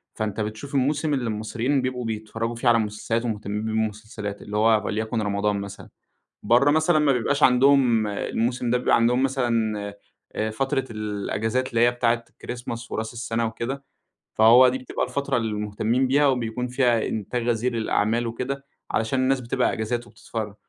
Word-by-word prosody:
فأنت 110 Hz, -1 st, -3 dB
بتشوف 110 Hz, +7 st, -4 dB
الموسم 145 Hz, +3 st, +1 dB
اللي 130 Hz, -3 st, -1 dB
المصريين 115 Hz, +6 st, -1 dB
بيبقوا 125 Hz, -1 st, -3 dB
بيتفرّجوا 115 Hz, +1 st, -3 dB
فيه 120 Hz, +2 st, -2 dB
على 115 Hz, -1 st, +5 dB
مسلسلات 110 Hz, +2 st, -2 dB
ومهتمين 105 Hz, -1 st, -3 dB
بيه 110 Hz, -, -2 dB
بالمسلسلات، 110 Hz, -1 st, -3 dB
اللي 105 Hz, 0 st, -4 dB
هو 110 Hz, 0 st, +4 dB
وليكن 110 Hz, +1 st, -1 dB
رمضان 100 Hz, 0 st, 0 dB
مثلًا، 100 Hz, 0 st, -9 dB, 0.5 s
برّه 120 Hz, +7 st, +4 dB
مثلًا 155 Hz, +1 st, +3 dB
ما 150 Hz, -2 st, +3 dB
بيبقاش 140 Hz, +4 st, 0 dB
عندهم 125 Hz, -3 st, +5 dB
الموسم 120 Hz, +4 st, -1 dB
ده 125 Hz, -, +3 dB
بيبقى 125 Hz, -, +3 dB
عندهم 120 Hz, +3 st, +3 dB
مثلًا، 120 Hz, -5 st, 0 dB, 0.6 s
آآ 110 Hz, 0 st, -1 dB
فترة 135 Hz, +3 st, -1 dB
الإجازات 110 Hz, +4 st, -2 dB
اللي 115 Hz, -2 st, +1 dB
هي 120 Hz, 0 st, +5 dB
بتاعة 120 Hz, -1 st, 0 dB
الChristmas 120 Hz, -1 st, -7 dB
وراس 110 Hz, +1 st, -3 dB
السنة 115 Hz, -1 st, -2 dB
وكده، 120 Hz, +5 st, -4 dB, 0.5 s
فهو 120 Hz, +4 st, +7 dB
دي 130 Hz, +1 st, -1 dB
بتبقى 130 Hz, -, -3 dB
الفترة 140 Hz, -1 st, -1 dB
المهتمين 110 Hz, +2 st, 0 dB
بيها 145 Hz, +3 st, +3 dB
وبيكون 125 Hz, -2 st, -1 dB
فيها 125 Hz, -3 st, +2 dB
إنتاج 115 Hz, +3 st, -3 dB
غزير 120 Hz, +1 st, +1 dB
للأعمال 115 Hz, +1 st, 0 dB
وكده، 130 Hz, +4 st, -4 dB, 0.3 s
علشان 115 Hz, +4 st, 0 dB
الناس 130 Hz, 0 st, +2 dB
بتبقى 125 Hz, +1 st, 0 dB
إجازات 120 Hz, +2 st, -3 dB
وبتتفرّج. 110 Hz, -3 st, -6 dB
115 Hz, 160 wpm, -24 LUFS, 110-130 Hz, 0.6 s, فهو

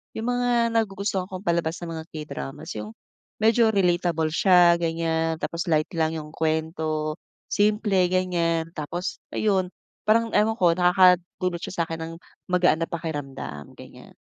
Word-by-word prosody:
yung 230 Hz, +3 st, -2 dB
mga 245 Hz, -1 st, +1 dB
nagugustuhan 200 Hz, -3 st, -1 dB
kong 185 Hz, 0 st, -7 dB
palabas 170 Hz, -2 st, 0 dB
na 170 Hz, -, -5 dB
mga -, -, -9 dB
K-dramas 150 Hz, -, -7 dB
yung, 105 Hz, 0 st, -7 dB, 0.5 s
medyo 225 Hz, +1 st, +4 dB
relatable 175 Hz, -5 st, +1 dB
siya, 175 Hz, 0 st, +5 dB
ganyan. 165 Hz, -1 st, 0 dB
Tapos 170 Hz, +2 st, -3 dB
light 155 Hz, -1 st, +2 dB
lang 160 Hz, -1 st, 0 dB
yung 150 Hz, -1 st, -8 dB
kuwento, 155 Hz, -1 st, -1 dB, 0.4 s
simple 205 Hz, -3 st, +2 dB
ganyan. 170 Hz, -3 st, 0 dB
Tapos 175 Hz, +4 st, -4 dB, 0.2 s
ayun, 195 Hz, -4 st, +1 dB, 0.4 s
parang 230 Hz, +1 st, +3 dB
ewan 220 Hz, +1 st, +2 dB
ko 175 Hz, -2 st, +5 dB
nakakadulot 180 Hz, 0 st, +3 dB
siya 175 Hz, -2 st, -2 dB
sa'kin 165 Hz, 0 st, -6 dB
ng, 165 Hz, +1 st, -5 dB, 0.4 s
magaan 180 Hz, -3 st, +3 dB
ng -, -, -3 dB
pakiramdam, 145 Hz, -, -6 dB
ganyan. -, -, -14 dB
170 Hz, 140 wpm, -25 LUFS, 160-190 Hz, 0.5 s, siya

